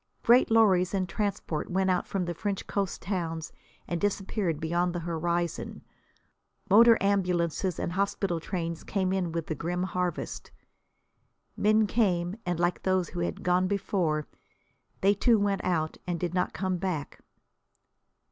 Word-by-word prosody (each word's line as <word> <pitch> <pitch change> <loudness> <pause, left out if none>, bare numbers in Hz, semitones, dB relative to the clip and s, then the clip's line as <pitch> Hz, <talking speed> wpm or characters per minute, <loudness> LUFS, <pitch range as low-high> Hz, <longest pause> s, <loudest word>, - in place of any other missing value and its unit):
Great 245 +2 +5
lorries 200 -5 +4
and 185 -1 0
transports 195 -5 -2
went 190 +1 +1
out 180 - 0
from 190 -2 -1
the 175 - -3
French 200 +3 -3
coast 195 -3 -2
towns 165 -4 -3 0.4
and 170 -1 -2
disappeared 195 -4 -1
beyond 175 +2 0
the 175 - -2
horizon; 170 0 -2 0.9
motor 230 +2 +8
ambulances 180 -3 0
and - - -2
hospital 195 -2 -1
trains 170 -1 -4
came 190 -2 -1
in 180 -3 -1
with 165 -1 -3
the - - -3
grim 175 +4 -2
harvest. 180 -1 -3 1.1
Men 215 +1 +3
came 185 -5 +1
and, 175 -1 -1
like 175 0 +1
those 185 -3 +1
who 175 - -6
had 175 - -3
gone 180 +1 +2
before, 180 -6 0 0.8
they 195 +1 +5
too 230 +3 +3
went 200 -1 0
out 160 -3 -1
and 175 -2 -2
did 175 0 -2
not 180 0 0
come 185 +1 -2
back. 170 -6 -3
180 Hz, 145 wpm, -28 LUFS, 170-195 Hz, 1.1 s, motor